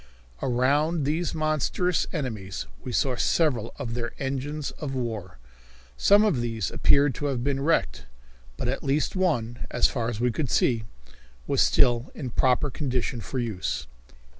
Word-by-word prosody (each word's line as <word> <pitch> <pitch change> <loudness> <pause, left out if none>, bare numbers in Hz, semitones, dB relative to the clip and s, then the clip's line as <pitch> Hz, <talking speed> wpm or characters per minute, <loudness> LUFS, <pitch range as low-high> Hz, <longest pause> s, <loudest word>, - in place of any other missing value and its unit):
Around 145 +6 +2
these 160 +4 -1
monstrous 155 +3 +1
enemies 105 - -4 0.2
we - - -5
saw 130 +1 +1
several 125 -5 +1
of 125 -5 -4
their 120 0 -3
engines 140 +2 -3
of 135 -3 -4
war. 110 - -4 0.6
Some 205 - +5
of 165 - +2
these 115 -5 -2
appeared 140 -1 +4
to 145 - -3
have 130 -4 -1
been 135 0 0
wrecked, 160 - +1 0.5
but - - -2
at 130 - -1
least 145 +5 0
one, 120 -11 0
as 125 - +1
far 120 -3 +1
as 115 -3 -4
we 125 +1 +2
could 140 +2 -2
see, 115 -3 +2 0.6
was - - +2
still 120 +1 +3
in 145 - -6
a - - -2
proper 130 +4 +2
condition 125 -3 -2
for 130 - -5
use. 110 - -2
130 Hz, 160 wpm, -26 LUFS, 120-150 Hz, 0.6 s, Some